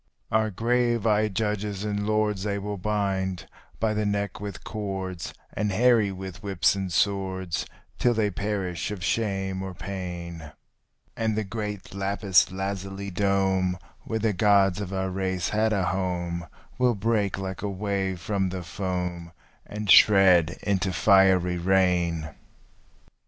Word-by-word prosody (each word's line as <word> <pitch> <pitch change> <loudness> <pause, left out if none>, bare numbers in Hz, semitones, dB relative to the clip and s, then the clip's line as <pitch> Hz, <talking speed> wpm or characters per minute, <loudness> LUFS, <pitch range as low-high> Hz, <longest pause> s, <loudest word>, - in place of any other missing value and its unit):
Our 110 0 +2
grave 120 +2 +1
eyed 105 -2 +2
judges 105 -2 -1
and 105 -1 -2
lords 105 -2 +1
they 100 0 -1
will 100 0 -4
bind 95 -3 -1 0.3
by 110 -1 +1
the 105 0 0
neck 100 -1 -1
with 100 -2 -6
cords, 95 -4 -4 0.2
And 105 0 -1
harry 115 -1 +4
with 95 -1 -8
whips 100 -4 +2
and 95 -2 -3
swords 95 -1 0 0.3
till 120 -1 +3
they 105 -2 +1
perish 95 -3 -2
of 100 -4 -5
shame 95 -3 -1
or 95 -1 -6
pain, 85 -5 -6 0.6
And 110 -1 -1
the 110 - +1
great 105 -2 -5
lapis 100 -2 +2
lazuli 95 +1 -4
dome 95 -1 +1 0.2
where 110 - -3
the 110 -1 +1
gods 100 0 +3
of 100 -2 -5
our 95 -1 -2
race 95 -2 -1
had 110 +1 +1
a 100 -4 +1
home 85 -1 -2 0.3
Will 125 -2 +3
break 105 -1 0
like 95 -1 -5
a 105 - -2
wave 95 -2 -2
from 95 +1 -1
the 90 -1 -5
foam, 90 -2 -4 0.4
and 105 0 -5
shred 90 -5 +6
into 95 -2 0
fiery 95 -2 +4
rain. 85 -4 +1
95 Hz, 140 wpm, -26 LUFS, 95-105 Hz, 0.6 s, shred